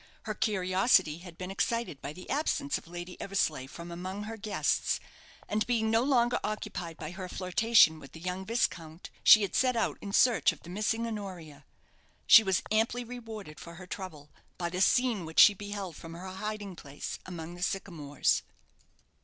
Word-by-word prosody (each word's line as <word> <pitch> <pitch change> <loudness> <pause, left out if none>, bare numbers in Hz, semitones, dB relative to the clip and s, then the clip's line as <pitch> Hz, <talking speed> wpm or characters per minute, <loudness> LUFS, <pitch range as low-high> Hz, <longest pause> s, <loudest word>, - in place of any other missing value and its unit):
Her 215 - -3
curiosity 185 -5 +2
had 175 -2 -12
been 185 +1 -5
excited 230 -6 -2
by 140 - -5
the 180 +4 -11
absence 285 0 0
of - - -19
Lady 175 +1 -8
Eversleigh 155 -9 -1
from 170 +4 -9
among 185 +4 -5
her 220 +2 -6
guests, 215 -1 0 0.5
and, 210 +1 0
being 225 -2 +1
no 225 +1 +4
longer 245 -2 +2
occupied 170 -5 -4
by 155 -1 -6
her 185 0 -7
flirtation 185 -3 +4
with 135 - -13
the 160 - -10
young 180 +2 -4
viscount, 175 -7 -2
she 215 - +9
had 200 - -3
set 255 -1 +2
out 230 - 0
in 200 - -6
search 240 +3 +4
of - - -14
the 175 - -10
missing 215 +4 -1
Honoria. 180 -10 -7 0.6
She 230 - +10
was 190 -4 0
amply 225 +3 +1
rewarded 225 -9 -8
for 170 0 -10
her 185 +1 -10
trouble 170 -6 -8 0.3
by 175 -1 -2
the 185 +1 -2
scene 240 -2 +3
which 160 0 -1
she 205 - +9
beheld 200 -3 -6
from 165 +2 -10
her 180 +2 -8
hiding 205 0 -5
place 145 -3 -7
among 170 -2 -7
the 175 - -11
sycamores. 165 -7 0
190 Hz, 180 wpm, -30 LUFS, 170-220 Hz, 0.6 s, She